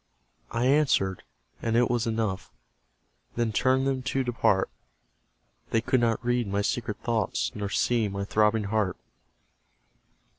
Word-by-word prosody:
I 115 +1 -1
answered 130 -10 +2 0.4
and 115 0 0
it 120 0 +4
was 120 -1 0
enough; 110 -4 -2 0.9
They 120 - +1
turned 130 +5 +2
them 135 -1 0
to 135 +1 -1
depart; 115 -6 +1 1.0
They 115 - +2
could 130 +3 +1
not 115 0 0
read 120 -2 +1
my 100 +1 -1
secret 115 -1 -2
thoughts, 105 - 0
Nor 100 -1 -4
see 115 +1 +1
my 100 0 -4
throbbing 105 +1 +2
heart. 100 -2 0
115 Hz, 135 wpm, -27 LUFS, 105-120 Hz, 1.0 s, it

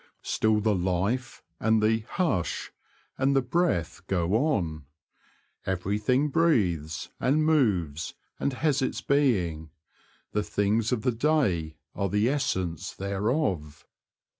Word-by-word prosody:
Still 110 -1 +2
the 105 0 +2
life, 95 +8 -1 0.2
and 110 0 +3
the 110 +1 +3 0.2
''hush," 135 - -1 0.5
and 135 +1 +2
the 135 - +4
breath 125 - 0
go 90 -1 0
on. 100 - 0 0.8
Everything 105 +10 0
breathes, 90 - +1
and 150 +4 +2
moves, 95 - +1 0.2
and 140 - 0
has 145 +1 +1
its 130 - -1
being; 95 - +1 0.6
the 105 - 0
things 105 +3 0
of 120 -4 0
the 125 - +2
day 115 - +1 0.2
are 100 -1 -1
the 105 +4 +2
essence 95 - -2
thereof. 100 - -2
105 Hz, 115 wpm, -27 LUFS, 90-135 Hz, 0.8 s, the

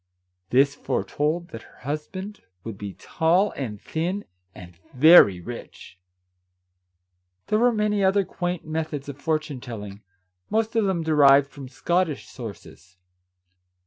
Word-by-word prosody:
This 140 +3 +4
fore - - -2
told 160 +4 -2
that 115 - -8
her - - -19
husband 185 - -6 0.2
would 115 -2 -6
be 100 -1 -7
tall 175 +6 +1
and 110 -7 -6
thin, 180 - -3 0.3
and 90 -1 -12 0.2
very 130 - +7
rich! 90 -3 -10 1.5
There 215 - +1
were 245 +1 +4
many 210 -2 0
other 195 +1 +3
quaint 175 -1 -4
methods 155 -2 -4
of 140 0 -8
fortune 155 -4 -2
telling, 105 -5 -8 0.5
most 225 +1 0
of 225 -2 +3
them 185 -4 0
derived 140 -3 +5
from 135 -1 -9
Scottish 170 +3 -1
sources. 100 -6 -11
150 Hz, 130 wpm, -24 LUFS, 125-180 Hz, 1.5 s, very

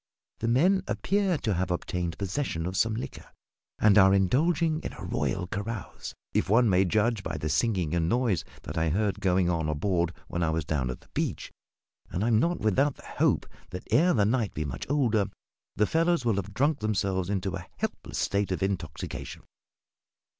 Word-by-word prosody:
The 115 - -1
men 175 +11 +4
appear 195 -3 +1
to 110 -6 -1
have 90 +1 -1
obtained 90 -1 -2
possession 100 - -2
of 90 +1 -3
some 110 +3 +2
liquor, 120 - -6 0.5
and 105 -1 +5
are 95 0 +6
indulging 155 - +2
in - - -5
a - - -9
royal 95 -2 -1
carouse 100 +2 -5 0.2
if - - +1
one 115 +3 +5
may 95 -1 +4
judge 110 +3 +1
by 80 -4 -4
the 75 +1 -3
singing 90 -2 +1
and 85 -1 +1
noise 115 -7 +1 0.2
that 80 +1 -4
I 80 0 +2
heard 100 +3 0
going 95 -2 +2
on 80 -3 0
aboard 85 +2 0 0.2
when 85 - -3
I 85 - +2
was 80 0 -1
down 65 -5 -1
at 65 - -5
the - - -23
beach - - -2 0.6
and 90 - -2
I 115 - +2
am 110 -2 +4
not 170 +7 0
without 130 +7 +2
the - - -16
hope - - +1 0.2
that 90 - -7
ere 180 +4 +4
the 105 -3 +3
night 115 -1 0
be 75 - -2
much 65 -3 -5
older 115 -8 +2 0.5
the 105 - +3
fellows 165 0 +1
will 115 -4 +2
have 100 +1 -3
drunk 145 +4 +2
themselves 95 -3 0
into 95 -1 -1
a 90 -2 -7
helpless - - -4
state 100 -1 0
of 95 - -1
intoxication. 90 -7 -4
100 Hz, 190 wpm, -28 LUFS, 90-120 Hz, 0.6 s, are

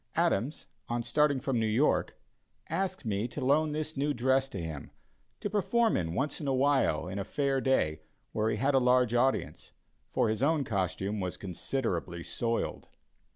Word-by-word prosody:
Adams, 125 +10 0 0.2
on 120 0 -1
starting 140 +3 +2
from 125 -1 -1
New 110 - +1
York, 115 +8 +2 0.5
asked 190 -3 -2
me 105 +1 0
to 125 - -5
loan 150 +3 +3
this 155 +1 -3
new 145 +1 0
dress 130 +2 +2
to 100 - -6
him 80 -4 -6 0.5
to - - -2
perform 210 +3 +2
in 80 0 -1
once 145 +7 -1
in 145 - -3
a 135 - +2
while 130 - +2
in 95 +2 -4
a - - -1
fair 135 +3 0
day, 80 - +1 0.3
where 110 0 0
he - - 0
had 140 +2 +1
a 135 - +5
large 125 -2 +3
audience, 130 +2 0 0.4
for - - +1
his 110 +2 -1
own 150 +1 +3
costume 100 -1 -2
was 90 -2 -3
considerably 90 -3 -3
soiled. 115 +4 -2
130 Hz, 175 wpm, -30 LUFS, 105-145 Hz, 0.5 s, a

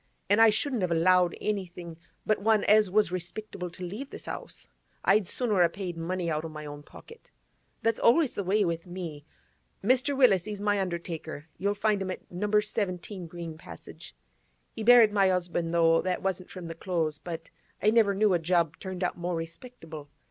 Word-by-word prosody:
An' 205 - +5
I 225 0 +8
shouldn't 245 +2 0
have 180 - 0
allowed 175 +1 +3
anything 180 -5 -4 0.3
but 215 - +1
one 215 0 +3
as 210 -1 +5
was 205 -1 +2
respectable 180 +1 -5
to 175 +2 -9
leave 210 +10 -6
this - - -9
'ouse; - - -7 0.4
I'd 200 -1 +4
sooner 215 -5 0
a 170 - +5
paid 180 -1 -5
money 175 +2 -3
out 155 -1 -1
o' 165 - -5
my 155 -1 -8
own 145 0 -8
pocket. 460 - -15 0.5
That's 225 -1 +1
always 275 +3 +4
the 200 - -3
way 200 +3 +2
with 170 +1 -3
me. 170 -5 -7 0.6
Mr. 260 +5 +2
Willis, 205 -10 +5
he's 210 -1 -5
my 205 -1 +1
undertaker; 170 -4 -5
you'll 200 +1 0
find 205 -1 +1
him 190 - -3
at 185 - -7
Number 210 +4 +1
17 195 -3 -3
Green 165 -1 -8
Passage. 80 -2 -11 0.6
He 220 - -6
buried 235 -2 +7
my 195 -2 +4
'usband; 175 -2 -1
though 165 -1 +4
that 185 0 -2
wasn't 185 -1 -2
from 185 -2 -8
the 165 - -5
Close; 165 -3 -2
but 165 -2 -7 0.3
I 210 - +3
never 220 -3 +4
knew 210 -1 +3
a 175 - +2
job 165 -1 +1
turned 185 -1 -5
out 175 - -2
more 175 0 -2
respectable. 165 - -8
185 Hz, 190 wpm, -28 LUFS, 170-210 Hz, 0.6 s, I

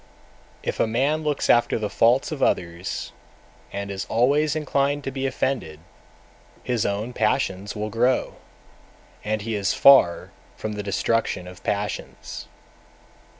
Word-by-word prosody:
253. - - -2
If - - -4
a - - +3
man 140 +7 +1
looks 150 -2 -1
after 120 - +4
the 110 -2 -2
faults 120 +8 +3
of 155 - -5
others, 85 0 -1 0.6
and 100 0 -4
is 95 -1 -4
always 140 +6 +2
inclined 145 -1 0
to 135 - -3
be 135 0 -2
offended, 120 - -2 0.8
his 120 -4 0
own 105 +5 -3
passions 105 -2 0
will 105 0 -3
grow, 125 +4 +1 0.9
and 110 0 -2
he 115 +1 -3
is 100 -2 0
far 135 -11 +6 0.3
from 110 - -4
the 105 - -4
destruction 100 -2 -1
of 90 0 -11
passions. 105 -1 -4
115 Hz, 140 wpm, -24 LUFS, 100-135 Hz, 0.9 s, far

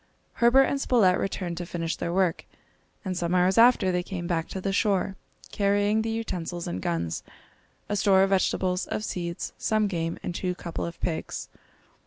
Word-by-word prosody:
Herbert 240 +3 +7
and 275 +1 -1
Spilett 200 -10 +4
returned 180 -3 -3
to 175 - -4
finish 165 -2 -2
their 170 - -3
work; 180 -2 +1 0.6
and 185 -1 -2
some 175 0 -1
hours 185 +3 +4
after 230 -5 +5
they 180 0 0
came 175 -1 -5
back 165 -2 -1
to 190 - -5
the 195 +1 -2
shore, 195 -2 +1 0.4
carrying 205 +1 +2
the 225 - -2
utensils 180 -6 -3
and 90 +2 -4
guns, 85 -1 -2 0.7
a 205 - -1
store 195 -2 +4
of 195 - +1
vegetables, 185 -1 +1
of 210 - -3
seeds, 170 -3 -4
some 215 -1 +1
game, 165 -4 -2
and 180 - -3
two 180 +1 -2
couple 170 -1 -4
of 170 - -9
pigs. 160 -2 -3
185 Hz, 180 wpm, -26 LUFS, 170-205 Hz, 0.7 s, Herbert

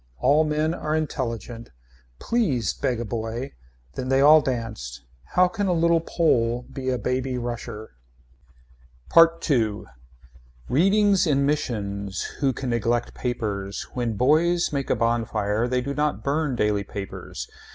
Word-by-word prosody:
All 145 - +4
men 155 +1 0
are 155 -3 -2
intelligent. 120 -6 -4 0.5
Please 145 - 0
beg 125 -4 -1
a 120 - -3
boy. 115 +4 -4 0.4
Then 130 - -4
they 135 0 +3
all 150 +3 +7
danced. 115 - -4 0.3
How 180 0 +6
can 200 +2 -2
a 180 - +2
little 170 0 +3
Pole 120 -8 +1
be 130 -1 -3
a 125 - 0
baby 125 +3 -2
rusher. 120 -3 -6 1.2
PART 165 0 +5
II. 110 -6 +1 0.8
Readings 195 - +3
in 140 -2 +2
missions. 100 -9 -2 0.2
Who 140 -2 +2
can 130 0 -4
neglect 120 +1 0
papers. 105 -5 -3
When 120 -2 -1
boys 160 - +2
make 140 -1 -2
a - - +3
bonfire 115 -1 0
they 125 0 0
do 140 +2 -3
not 150 +1 -1
burn 145 -1 0
daily 105 -3 +1
papers. 100 0 -7
125 Hz, 140 wpm, -24 LUFS, 115-150 Hz, 1.2 s, all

